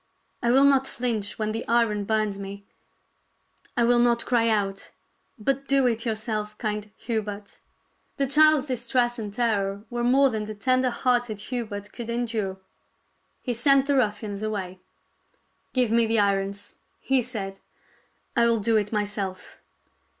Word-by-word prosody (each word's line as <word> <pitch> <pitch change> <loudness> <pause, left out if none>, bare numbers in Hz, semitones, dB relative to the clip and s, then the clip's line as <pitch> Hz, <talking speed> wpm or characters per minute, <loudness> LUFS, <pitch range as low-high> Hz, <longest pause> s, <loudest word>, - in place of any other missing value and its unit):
I 235 - +1
will 265 +3 +5
not 270 -1 +4
flinch 225 -5 -3
when 215 -1 -1
the 225 +2 -3
iron 230 -3 +2
burns 215 -2 0
me; 200 0 -8 1.1
I 240 - +4
will 240 +1 +4
not 240 -1 +2
cry 230 -2 +2
out. 200 -3 -1 0.5
But 275 +5 -1
do 275 -1 +3
it 235 -1 0
yourself, 215 -1 -3
kind 210 -1 -3
Hubert." 210 -3 -4 0.6
The 275 - +2
child's 300 +1 +5
distress 240 -2 0
and 210 -2 -5
terror 205 -3 0
were 240 0 -2
more 265 +2 +4
than 215 -1 -3
the 215 - -6
tender 255 +5 +2
hearted 240 -3 0
Hubert 205 -4 -4
could 235 -1 -7
endure. 225 -5 -2 0.9
He 245 - -1
sent 270 +3 +4
the 285 0 +1
ruffians 210 -4 -1
away. 195 -4 -4 0.5
" - - -43
Give 250 -3 +3
me 230 0 +4
the 225 +1 +1
irons," 200 0 0 0.3
he 265 -1 +2
said, 200 -6 -6 0.4
" - - -40
I 235 - +4
will 230 -1 +3
do 220 +2 +2
it 210 -1 -1
myself." 205 -3 -4
225 Hz, 155 wpm, -25 LUFS, 205-245 Hz, 1.1 s, will